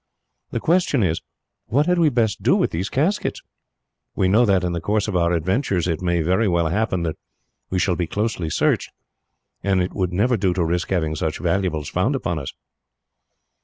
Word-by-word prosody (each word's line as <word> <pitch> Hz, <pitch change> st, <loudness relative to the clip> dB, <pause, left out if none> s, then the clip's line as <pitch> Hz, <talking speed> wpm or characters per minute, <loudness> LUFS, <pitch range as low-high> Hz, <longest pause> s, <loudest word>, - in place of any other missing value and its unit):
The -, -, -2 dB
question 165 Hz, -, +2 dB
is, 85 Hz, -3 st, 0 dB, 0.5 s
what 145 Hz, +6 st, +2 dB
had 180 Hz, 0 st, +2 dB
we 165 Hz, -2 st, +5 dB
best 115 Hz, -6 st, 0 dB
do -, -, +3 dB
with -, -, +1 dB
these 90 Hz, +5 st, -2 dB
caskets? 170 Hz, +10 st, -1 dB, 0.7 s
We 95 Hz, -, +2 dB
know 110 Hz, +6 st, +4 dB
that, 95 Hz, -3 st, +2 dB
in 90 Hz, -, 0 dB
the 85 Hz, -1 st, -3 dB
course 105 Hz, +4 st, 0 dB
of 105 Hz, -, -3 dB
our 85 Hz, -1 st, +2 dB
adventures, 90 Hz, -, 0 dB
it 85 Hz, -1 st, -1 dB
may 85 Hz, -2 st, +1 dB
very 95 Hz, +7 st, +2 dB
well 85 Hz, -3 st, +1 dB
happen 95 Hz, -2 st, 0 dB
that 80 Hz, -2 st, -3 dB, 0.5 s
we 95 Hz, -, -1 dB
shall 90 Hz, 0 st, +1 dB
be 85 Hz, -1 st, -2 dB
closely 105 Hz, -3 st, -2 dB
searched, -, -, +1 dB, 0.7 s
and 95 Hz, -1 st, +1 dB
it 90 Hz, 0 st, -1 dB
would 90 Hz, -2 st, -1 dB
never 115 Hz, +7 st, +2 dB
do 95 Hz, -3 st, +1 dB
to 85 Hz, -, +1 dB
risk 85 Hz, +2 st, -1 dB
having 80 Hz, -5 st, 0 dB
such 80 Hz, +1 st, -2 dB
valuables 85 Hz, -4 st, -1 dB
found 100 Hz, -, 0 dB
upon 85 Hz, -11 st, -2 dB
us." 70 Hz, -, -6 dB
95 Hz, 195 wpm, -22 LUFS, 85-110 Hz, 0.7 s, we